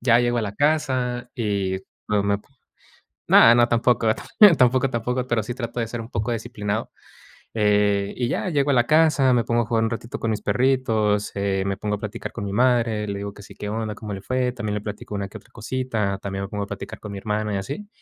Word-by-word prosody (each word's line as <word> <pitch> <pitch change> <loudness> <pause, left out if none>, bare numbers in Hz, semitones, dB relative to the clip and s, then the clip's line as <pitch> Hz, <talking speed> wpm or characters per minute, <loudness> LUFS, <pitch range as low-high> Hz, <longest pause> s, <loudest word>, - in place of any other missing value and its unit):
Ya 120 -1 +4
llego 120 0 +1
a - - 0
la 100 -1 -4
casa 130 -5 0
y 100 -5 -1 0.3
no 105 -1 +2
me 100 0 +1 0.9
no 115 +1 +8
no, 120 0 +5
tampoco, 120 -1 +2 0.5
tampoco, 130 +1 +3
tampoco, 125 +2 -2
pero 120 -3 0
sí 120 +3 -5
trato 120 -1 -4
de 115 - -1
ser 120 0 -5
un 115 - -11
poco 110 +3 -2
disciplinado. 110 -2 -3 0.6
Eh, 105 -2 +2
y 120 - 0
ya, 185 - -1
llego 145 -2 +1
a - - +3
la 120 -1 +3
casa, 155 -4 +4
me 120 -2 +2
pongo 120 0 +1
a - - -5
jugar 115 0 +1
un 115 - 0
ratito 115 +4 -5
con 115 -1 0
mis 105 0 -4
perritos, 110 -3 +1
eh, 100 -1 0
me 100 0 -1
pongo 105 -1 -2
a - - -10
platicar 105 -2 -6
con 115 - -6
mi 100 - -4
madre, 115 -2 +2
le 100 0 -3
digo 100 0 -5
que 100 - -12
"Sí, - - -13
qué 105 - -6
onda, 110 0 -3
cómo 105 -1 -7
le 95 - -6
fue", 130 +1 0
también 110 -4 -3
le - - -2
platico 105 0 -7
una 100 -1 -3
que 110 +2 -10
otra - - -23
cosita, 115 -4 -2
también 95 0 -4
me - - -6
pongo 105 -1 -3
a 100 - -13
platicar 100 - -7
con 105 -1 -7
mi 100 - -5
hermana 105 0 -2
y - - 0
así, 145 - -6
115 Hz, 235 wpm, -23 LUFS, 105-125 Hz, 0.9 s, no